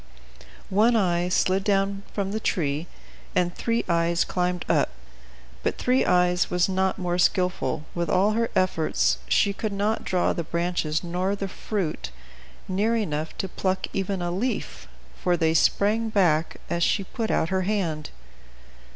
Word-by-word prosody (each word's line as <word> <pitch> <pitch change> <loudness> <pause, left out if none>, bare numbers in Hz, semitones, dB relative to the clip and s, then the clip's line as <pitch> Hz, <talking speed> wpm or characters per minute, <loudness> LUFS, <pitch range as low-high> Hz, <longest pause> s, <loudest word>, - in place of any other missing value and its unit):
One 220 +5 +4
Eye 175 -4 +2
slid 185 +1 +2
down 195 -1 +1
from 195 -1 -2
the 220 - -1
tree, 155 -5 -1 0.5
and 175 -1 +2
Three 230 +3 -1
Eyes 170 0 +2
climbed 180 -1 -1
up. - - +2 0.7
But - - -1
Three 255 +1 +2
Eyes 180 0 +3
was 180 0 +2
not 190 0 0
more 180 -2 -1
skilful; 180 -6 +1
with 170 0 -2
all 195 +3 +3
her 230 +1 0
efforts 155 - +1
she 200 - +3
could 215 +1 -3
not 205 +2 -1
draw 180 -1 +1
the 170 - -3
branches, 170 -1 -1
nor 180 +3 -1
the 200 -1 -3
fruit, 190 -4 -3 0.6
near 205 +5 +1
enough 160 -8 -2
to 190 - -2
pluck 190 +1 -1
even 195 -1 -2
a 175 - -1
leaf, 215 +5 -3 0.3
for 175 -1 +2
they 160 -1 +2
sprang 215 +7 +2
back 170 -6 +2
as 170 - -2
she 195 +3 +2
put 225 +3 -4
out 160 - +1
her 190 0 +1
hand. 180 -6 -1
185 Hz, 155 wpm, -25 LUFS, 170-200 Hz, 0.7 s, One